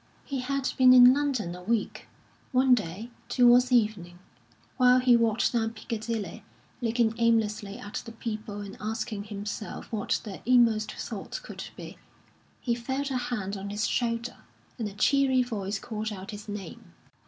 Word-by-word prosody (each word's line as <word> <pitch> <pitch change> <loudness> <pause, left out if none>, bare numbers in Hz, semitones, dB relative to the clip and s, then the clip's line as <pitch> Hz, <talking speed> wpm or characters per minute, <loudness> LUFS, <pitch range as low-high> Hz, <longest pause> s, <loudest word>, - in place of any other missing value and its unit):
He 275 -2 -3
had 275 +1 -1
been 255 -1 +8
in 250 0 +9
London 270 -11 -1
a 180 - -9
week. 225 +3 -2 0.5
One 255 0 +5
day, 215 +1 -2 0.2
towards 245 0 +5
evening, 210 -7 +1 0.6
while 250 -1 +6
he 250 -1 +5
walked 230 0 +2
down 225 -1 0
Piccadilly, 220 -4 -5 0.4
looking 230 -1 +1
aimlessly 215 -3 +1
at 205 +1 -6
the 230 - -9
people 215 -2 -5
and 200 -1 -8
asking 215 -1 -3
himself 210 +1 -6
what 215 -3 0
their 200 -4 -8
inmost 230 -3 +3
thoughts - - -6
could - - -8
be, - - -10 0.6
he 240 - 0
felt 265 +4 -3
a 260 - 0
hand 210 -5 -3
on 200 0 -6
his 205 +2 -1
shoulder, 235 0 -1 0.4
and 220 - -1
a - - -12
cheery 260 +4 +3
voice 205 -4 -3
called 215 +1 -4
out 195 0 -7
his 210 0 -9
name. 190 - -8
225 Hz, 155 wpm, -28 LUFS, 205-245 Hz, 0.6 s, in